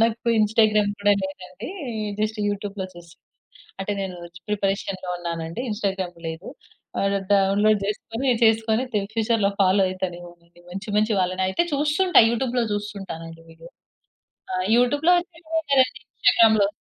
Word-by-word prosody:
నాకు 230 +1 0
ఇన్‌స్టాగ్రామ్ 215 -1 +3
కూడా 205 0 +4
లేదండి 190 +2 -7 0.5
జస్ట్ 215 +1 -1
యూట్యూబ్‌లో 200 -1 -4
చూసా. 170 -1 -14 0.6
అంటే 195 +2 -2
నేను 190 -2 -4 0.3
ప్రిపరేషన్‌లో 195 -2 -2
ఉన్నానండి. 170 +2 -5
ఇన్‌స్టాగ్రామ్ 195 -4 -3
లేదు. 160 +5 -7 0.5
ఆహ్, 200 0 +1 0.2
డౌన్లోడ్ 200 +2 +3
జేసుకొని 225 +5 -3 0.2
చేసుకొని 220 +1 +3
తిన్ 200 -1 0
ఫ్యూచర్‌లో 225 -2 +1
ఫాలో 195 +1 +4
అయితానేమో 175 -2 -5
అండి. 170 0 -23
మంచి 195 +5 -7
మంచి 215 +1 +2
వాళ్ళని 185 +1 0
అయితే 265 - +1
చూస్తుంటా 300 +6 +4
యూట్యూబ్‌లో 240 0 0
చూస్తుంటాను 200 -5 -5
అండి 165 0 -12
వీడియో. 165 +1 -14 0.8
ఆ! - - -2 0.2
యూట్యూబ్‌లో 290 +8 +3
వచ్చినవే 325 -2 -5
కదండీ 260 -1 +3
ఇన్‌స్టాగ్రామ్‌లో. 220 -4 +4
205 Hz, 130 wpm, -23 LUFS, 185-225 Hz, 0.8 s, కూడా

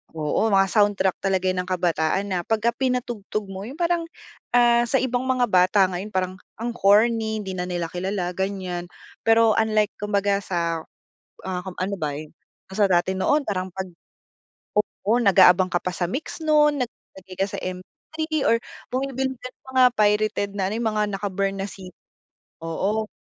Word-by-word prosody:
Oo, 155 +7 0
mga 195 -2 +4
soundtrack 205 -3 +2
talaga 190 -2 0
yan 185 - -2
ng - - -14
kabataan 175 0 +1
na 180 - 0
pagka 225 +1 +2
pinatugtog 235 -5 -3
mo 195 +2 -6
yung 265 - -8
parang, 340 0 0 0.5
ah, 240 0 +5
sa 255 - -1
ibang 255 -1 0
mga 255 -1 +2
bata 185 +2 +4
ngayon 180 +3 -4
parang 185 -2 -2 0.2
ang 235 +2 -3
corny 220 0 +3
hindi 190 - -5
na 180 -1 -3
nila 175 -2 -3
kilala, 180 0 -2
ganiyan. 185 -2 -3 0.4
Pero 225 0 +6
unlike 215 -2 +2
kumbaga 200 -1 +1
sa, 170 -4 -2 0.7
ah, 180 -1 -2
kung 190 -1 -8
ano 195 +2 -1
ba 155 -6 -2 0.6
kasi 190 +2 0
dati 180 +2 +2
noon 285 +9 +1
parang 185 -2 -2
'pag, 190 +1 -5 0.9
oo, 210 0 -1
nag-aabang 185 -2 +6
ka 175 - +1
pa 185 0 -4
sa 175 -1 -1
MYX 315 +5 -5
nun 300 -2 +3
nag 240 - -6
naglalagay 190 -1 -15
ka 195 - +2
sa - - -4
MP3 185 +11 -9 0.2
or 230 - +3 0.3
bumibili 265 0 -1
ka - - -6
ng - - -64
mga 260 -1 +4
pirated 210 -1 +2
na 190 - +1
ano, 205 - -3
yung 230 -1 0
mga 210 0 +1
naka-burn 195 0 -2
na 195 - -3
CD, 185 -2 -11 0.7
oo, 200 +7 -1
200 Hz, 170 wpm, -23 LUFS, 185-230 Hz, 0.9 s, Pero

